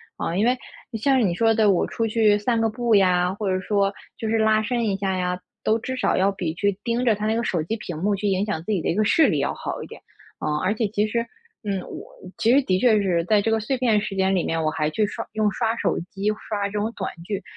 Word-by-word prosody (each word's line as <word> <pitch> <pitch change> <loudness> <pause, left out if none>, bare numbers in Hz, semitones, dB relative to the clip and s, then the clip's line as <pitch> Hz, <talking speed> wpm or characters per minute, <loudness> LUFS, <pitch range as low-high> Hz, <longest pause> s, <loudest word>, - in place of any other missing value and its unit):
啊， 165 - -3
因 210 - +2
为 250 +1 +2 0.4
像 270 +3 +3
是 235 - +3
你 180 - +1
说 225 +3 +3
的， 220 -2 +3
我 180 - +2
出 225 -1 -2
去 215 -2 +3
散 230 +3 0
个 225 - +2
步 235 0 +1
呀， 180 -2 +3
或 200 0 -3
者 185 0 +1
说 200 +1 0 0.2
就 220 - -3
是 225 - +2
拉 220 0 +3
伸 235 +1 -1
一 200 - 0
下 195 -1 -1
呀， 180 0 -1 0.3
都 220 - +3
至 260 +3 -4
少 - - +1
要 195 +2 +3
比 175 -5 -3
去 200 +2 -1
盯 235 +1 0
着 230 - +4
它 210 +1 -3
那 220 +1 +1
个 235 - 0
手 175 -8 0
机 195 +8 -2
屏 175 -7 -6
幕 200 +5 +1
去 200 - -5
影 195 +1 +1
响 200 -7 -3
自 215 - -4
己 195 -5 +1
的 - - -3
一 - - +1
个 215 - +2
视 315 +10 +4
力 - - +1
要 - - 0
好 - - -5
一 - - -9
点。 - - -12 0.4
啊， 150 - -1
而 205 - +2
且 220 0 0
其 210 +1 0
实 235 +2 -1 0.4
嗯， 200 -2 -1
我 - - -8 0.3
其 230 - +3
实 275 - +5
的 185 -7 +1
确 220 -3 +4
是 175 -4 +1
在 210 +1 +3
这 225 - 0
个 225 - +2
碎 240 +5 -2
片 230 -4 +3
时 205 -1 -4
间 190 0 +2
里 175 - +1
面， 165 0 -1
我 155 - +1
还 155 -1 -1
去 215 +5 +1
刷 - - -5
用 215 -1 +1
刷 225 +3 -1
手 - - 0
机， 200 +2 -1 0.2
刷 205 -2 -1
这 200 - -10
种 210 +2 -1
短 - - -4
剧 200 +2 -3
210 Hz, 300 characters per minute, -23 LUFS, 190-225 Hz, 0.4 s, 实